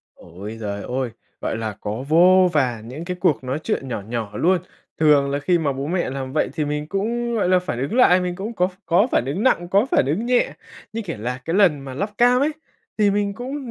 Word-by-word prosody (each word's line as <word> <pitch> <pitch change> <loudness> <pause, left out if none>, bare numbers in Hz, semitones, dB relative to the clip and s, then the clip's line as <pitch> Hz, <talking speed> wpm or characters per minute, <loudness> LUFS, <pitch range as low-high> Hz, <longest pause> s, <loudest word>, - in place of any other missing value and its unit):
Ôi 100 +6 -9
giời 100 -2 -4
ôi! 125 -1 -2 0.3
Gọi - - -2
là, 110 -1 -3
có 110 +5 -4
vô 180 +3 +6
vàn 120 -6 0
những 150 +7 -7
cái 180 0 -4
cuộc 140 -5 +1
nói 130 +4 -2
chuyện 135 -3 -3
nhỏ 115 - -3
nhỏ 115 -3 -3
luôn. 180 +6 +3 0.4
Thường 145 -3 +4
là 140 - 0
khi 175 +4 +2
mà 145 -4 0
bố 135 +2 -4
mẹ 175 -4 -1
làm 135 -1 -5
vậy 155 - +1
thì 155 -2 -1
mình 150 0 -3
cũng, 235 +5 -1
gọi 200 -5 +1
là, 185 0 +5
phản 180 -9 -4
ứng 140 - -2
lại, 185 -8 +6
mình 180 -1 -2
cũng 215 +4 -5
có 180 -2 +2
ph 185 - -9
có 180 +7 +4
phản - - +2
ứng 165 +10 -2
nặng, 175 -9 +2
có 200 +6 +3
phản - - +3
ứng 190 +12 -1
nhẹ 250 -1 +2 0.4
như, 230 0 -3
kiểu 165 - -6
là, 125 +3 -3
cái 165 - -2
lần 175 -9 +4
mà 135 -1 -8
lắp 200 +9 -2
cam 245 +1 +5
ấy, 295 +2 +2 0.5
thì 205 -1 +4
mình 200 0 0
cũng 260 +1 -6
165 Hz, 245 wpm, -22 LUFS, 130-200 Hz, 0.5 s, vô